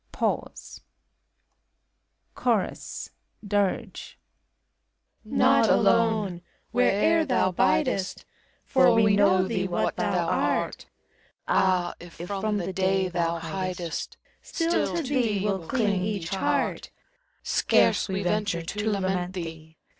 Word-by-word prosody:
Pause. - - -3 1.5
CHORUS - - -2 0.4
[Dir^.] 200 -1 0 1.3
Not - - +3
alone! 215 -6 +2 0.3
where'er 250 +7 +3
thou 250 -9 +1
biifest; 190 - 0 0.4
For 260 -3 +4
we 210 -2 +4
know 190 -2 +3
thee 190 -4 -1
what 175 - -1
thou - - 0
art. - - -1 0.6
Ah! 185 -2 +2
if 175 -1 -12
from 200 +4 -3
the 185 -1 -3
Day 190 0 +1
thou 170 -1 -1
faidest, 175 0 -4 0.2
Still 330 0 -1
to 335 - -1
thee 245 -7 0
will 190 -5 -2
ding 210 -7 0
each 195 -4 -3
heart. 190 0 -1 0.5
Scarce - - +2
we 190 +1 -2
venture 200 -3 -1
to 210 +6 -3
lament 185 -3 -1
thee. 160 -3 -8
195 Hz, 105 wpm, -26 LUFS, 180-215 Hz, 1.5 s, For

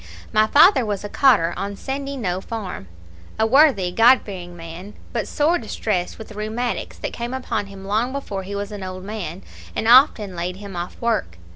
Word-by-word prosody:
My 215 0 +4
father 310 - +6
was 205 -3 -3
a 205 - -5
cotter 205 -13 +4
on 200 +2 -4
Sandyknowe 265 -7 -3
farm, 210 - -6 0.5
a 220 - +3
worthy, 250 - +4
God 235 +7 +6
fearing 175 -3 -8
man, 170 +5 -9 0.2
but - - -2
sore 315 +4 +2
distressed 210 -5 -2
with 220 - -10
the - - -10
rheumatics, 220 +4 -3
that - - -5
came 240 +2 -4
upon 255 -5 -3
him 195 -1 -11
long 220 +5 0
before 260 -8 -4
he 195 +2 -6
was 200 +1 -4
an 205 -1 -7
old 185 0 -6
man, 195 -4 -6 0.3
and 220 - -1
often 235 -6 +5
laid 175 +1 -3
him 200 -1 -9
off 175 +1 -5
work. 220 - -1
210 Hz, 185 wpm, -22 LUFS, 185-240 Hz, 0.5 s, father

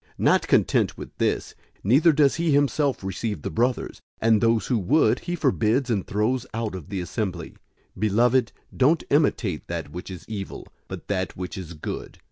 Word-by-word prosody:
Not - - +3
content - - +2
with - - -9
this, - - 0 0.3
neither 140 - +5
does 145 -1 +3
he 170 0 0
himself 140 -2 +1
receive 100 +3 -3
the - - -3
brothers, 120 +2 -1 0.2
and 110 -1 +3
those 115 -1 +2
who 125 -4 +1
would, 135 - +3
he 175 0 -4
forbids 125 -4 +1
and 100 -5 -1
throws 110 +5 0
out 115 -3 -2
of 95 -1 -8
the 100 -3 -3
assembly. 90 -1 -4 0.4
001:011 - - -13
Beloved, 115 +4 +3 0.2
don't 150 +5 +3
imitate 115 - +1
that - - -5
which 90 +4 -7
is 90 -3 -8
evil, 100 -3 -6 0.2
but - - -8
that 95 -3 -2
which 90 +2 -5
is 90 -4 -7
good. 75 - -6
110 Hz, 175 wpm, -24 LUFS, 95-130 Hz, 0.4 s, neither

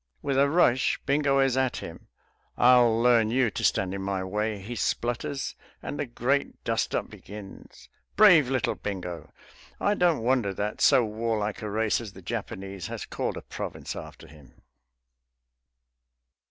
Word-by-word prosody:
With 140 -2 -1
a 140 0 +4
rush 140 -6 +3
Bingo 140 0 +2
is 135 -2 +3
at 130 -1 0
him. - - -9 0.5
"I'll 120 -2 +5
learn 115 -2 +4
you 125 -1 +2
to - - -5
stand 95 0 +1
in 100 - -4
my 95 -1 -2
way," 105 +3 -2
he 105 +5 -7
splutters. 120 +4 -2 0.3
And 145 - -5
the 145 - -2
great 130 +4 -1
dust - - -1
up - - -2
begins.... 100 -1 -12 0.3
Brave 175 -11 +7
little 130 -3 0
Bingo! 90 -4 -6 0.5
I 205 - +2
don't 175 - +2
wonder 120 -6 +1
that 105 +2 -3
so 125 - +5
warlike 110 0 -2
a 105 - -4
race 110 +2 0
as 105 -4 -8
the 95 - -13
Japanese 95 +1 -5
has - - -6
called - - -3
a - - -8
province - - -6
after - - -9
him. 75 -6 -18
115 Hz, 155 wpm, -27 LUFS, 100-130 Hz, 0.5 s, Brave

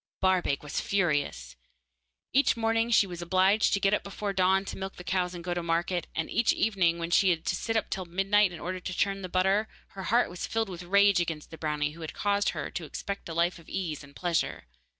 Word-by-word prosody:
Barbaik 185 -7 +1
was 145 - -3
furious. 145 - -1 0.8
Each 270 -2 +4
morning 225 0 +1
when - - -5
she 215 - +5
was 175 -2 -7
obliged 190 +5 +3
to - - -1
get 195 +1 +2
up - - +2
before 200 0 -4
dawn 190 +1 +3
to - - -5
milk 190 0 -5
the 180 - -10
cows 180 -1 -1
and 170 - -7
go 175 0 -2
to 175 - -2
market, 170 +1 -1
and 160 - -1
each 235 - +2
evening 185 -6 +2
when 170 0 -4
she 190 +2 +5
had 165 -2 0
to - - 0
sit 225 +4 -1
up 220 - 0
till 185 - -2
midnight 195 +3 +2
in 170 - -8
order 185 +2 -4
to 185 +1 -5
churn 195 -1 0
the 185 - -6
butter, 190 +4 +2 0.2
her 190 -1 -8
heart 235 +3 +3
was 180 - -5
filled 225 -2 -1
with 180 -2 -7
rage 200 +1 +4
against 165 -3 -3
the 160 - -9
brownie 150 -1 -1
who 165 +2 -12
had 160 - -6
caused 205 0 +1
her - - -4
to 175 - -4
expect 200 +4 -6
a 165 - -5
life 170 +1 +1
of 165 - -16
ease 165 -7 -3
and 140 0 -15
pleasure. 175 -2 -1
185 Hz, 240 wpm, -28 LUFS, 170-200 Hz, 0.8 s, she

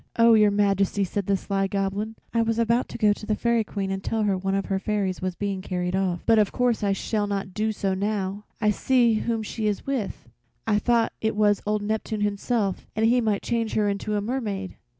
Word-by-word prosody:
"Oh! 230 0 +6
Your 210 -1 +6
Majesty," 200 -1 +2
said 195 +1 -3
the 200 -1 +2
sly 195 +1 -2
little 195 +1 -2
Goblin, 205 +3 -3 0.2
"I 230 - +3
was 225 0 0
about 235 +1 +1
to - - -6
go 210 -2 +4
to 205 - -12
the 215 - +1
Fairy 235 0 +1
Queen 195 -2 -4
and 195 0 -3
tell 225 -1 0
her 200 -2 +2
one 195 +1 -1
of 195 - -1
her 195 -1 -1
fairies 200 -2 -1
was 185 -1 -2
being 200 -1 -3
carried 180 -1 -2
off, 185 -3 -1
but 225 -1 +5
of 210 - +2
course 245 -3 +1
I 200 - +2
shall 205 +1 -1
not 195 -2 -3
do 215 +3 0
so 195 -2 -1
now. 200 0 -2
I 210 -2 +3
see 240 +1 +3
whom 225 +1 -1
she 215 0 -3
is 205 -2 -2
with. 250 - -3 0.4
I 210 -2 +2
thought 235 0 +2
it 220 -1 0
was 205 -1 +3
old 210 0 0
Neptune 215 0 -2
himself 205 0 -1
and 220 +1 +2
he 245 +2 +4
might 215 -3 0
change 230 -2 -1
her 210 -1 +2
into 205 +1 -2
a 205 - 0
mermaid." 205 -5 -3
210 Hz, 230 wpm, -25 LUFS, 195-225 Hz, 0.4 s, Oh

